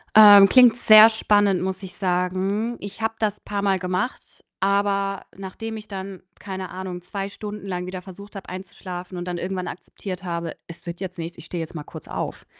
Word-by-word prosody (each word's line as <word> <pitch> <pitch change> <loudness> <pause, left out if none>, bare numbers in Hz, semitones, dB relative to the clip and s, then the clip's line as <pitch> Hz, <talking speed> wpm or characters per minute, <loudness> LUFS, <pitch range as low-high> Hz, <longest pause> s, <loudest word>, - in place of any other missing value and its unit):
Ähm, 205 -2 +10
klingt 250 0 +7
sehr 215 -1 +9
spannend, 205 -4 +2
muss 190 0 -3
ich 185 -2 -9
sagen. 190 +5 -1
Ich 205 +2 -8
habe 225 0 -1
das 210 -2 -1
paarmal 200 -2 -1
gemacht, 185 +6 -4 0.2
aber 200 0 +1
nachdem 210 +4 -6
ich 215 -1 -9
dann, 195 -1 -7 0.2
keine 190 -2 -6
Ahnung, 185 -1 -6
2 195 +2 -5
Stunden 210 0 -7
lang 180 -1 -4
wieder 185 0 -6
versucht 200 +2 -12
habe 195 - -8
einzuschlafen 185 -1 -7
und 175 - -4
dann 175 -1 -3
irgendwann 185 0 -3
akzeptiert 190 +1 -7
habe: 170 -2 -4
„Es 170 +1 -12
wird 170 +2 -7
jetzt 185 -1 -5
nichts, 170 +1 -6
ich 165 - -11
stehe 170 -1 -4
jetzt 160 - -10
mal 150 - -5
kurz - - -11
auf.“ - - -5
190 Hz, 190 wpm, -23 LUFS, 180-205 Hz, 0.2 s, Ähm